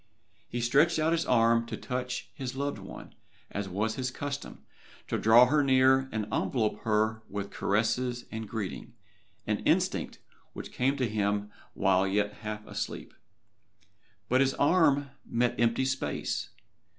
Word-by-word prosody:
He 120 Hz, -, -3 dB
stretched 145 Hz, +8 st, +3 dB
out 155 Hz, +1 st, +2 dB
his 165 Hz, 0 st, 0 dB
arm 115 Hz, -1 st, +3 dB
to -, -, -5 dB
touch 125 Hz, -1 st, -4 dB
his 130 Hz, -2 st, -5 dB
loved 140 Hz, +1 st, -2 dB
one, -, -, -10 dB, 0.4 s
as 100 Hz, -1 st, -4 dB
was 110 Hz, +4 st, -1 dB
his 130 Hz, -1 st, -1 dB
custom, 140 Hz, +2 st, -6 dB, 0.4 s
to -, -, -1 dB
draw 115 Hz, +3 st, +7 dB
her 145 Hz, +3 st, +2 dB
near 130 Hz, 0 st, +4 dB
and 110 Hz, -1 st, -2 dB
envelop 110 Hz, -4 st, 0 dB
her 110 Hz, +1 st, 0 dB
with 100 Hz, 0 st, -5 dB
caresses 120 Hz, +4 st, 0 dB
and 110 Hz, -2 st, -5 dB
greeting 105 Hz, -5 st, -5 dB, 0.5 s
an -, -, 0 dB
instinct -, -, 0 dB, 0.4 s
which -, -, -8 dB
came 135 Hz, +3 st, 0 dB
to 130 Hz, -3 st, +1 dB
him 105 Hz, -1 st, -1 dB, 0.2 s
while 95 Hz, -1 st, +3 dB
yet 105 Hz, +1 st, 0 dB
half 105 Hz, 0 st, -6 dB
asleep. -, -, -5 dB, 1.1 s
But 130 Hz, +2 st, +3 dB
his 135 Hz, -1 st, +2 dB
arm 145 Hz, -3 st, +3 dB
met 120 Hz, -1 st, 0 dB
empty 120 Hz, +2 st, +2 dB
space. 130 Hz, 0 st, -2 dB
120 Hz, 145 wpm, -29 LUFS, 105-135 Hz, 1.1 s, draw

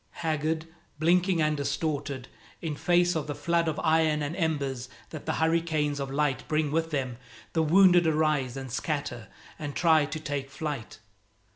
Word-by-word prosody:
Haggard, 160 Hz, 0 st, 0 dB, 0.3 s
blinking 175 Hz, +1 st, +3 dB
and 150 Hz, 0 st, +2 dB
distorted, 145 Hz, -2 st, -2 dB, 0.3 s
in 160 Hz, -3 st, -3 dB
face 175 Hz, +2 st, +3 dB
of 155 Hz, -2 st, -2 dB
the 145 Hz, -, -3 dB
flood 170 Hz, -1 st, +1 dB
of 155 Hz, -, -1 dB
iron 160 Hz, -2 st, +3 dB
and 145 Hz, +3 st, -3 dB
embers 140 Hz, -7 st, -1 dB, 0.2 s
that 155 Hz, -, -8 dB
the -, -, +1 dB
hurricanes 160 Hz, -3 st, +1 dB
of 135 Hz, -1 st, -3 dB
light 140 Hz, -2 st, 0 dB
bring 155 Hz, -1 st, +1 dB
with 165 Hz, +1 st, 0 dB
them, 130 Hz, -5 st, -2 dB, 0.4 s
the 160 Hz, -, +2 dB
wounded 175 Hz, +1 st, +6 dB
arise 150 Hz, -5 st, +1 dB
and 130 Hz, -2 st, -6 dB
scatter 140 Hz, -3 st, -3 dB, 0.3 s
and 145 Hz, -2 st, -5 dB
try 160 Hz, -4 st, +4 dB
to 155 Hz, +1 st, -5 dB
take 145 Hz, -3 st, -4 dB
flight. 140 Hz, -4 st, -5 dB
155 Hz, 160 wpm, -28 LUFS, 140-160 Hz, 0.4 s, wounded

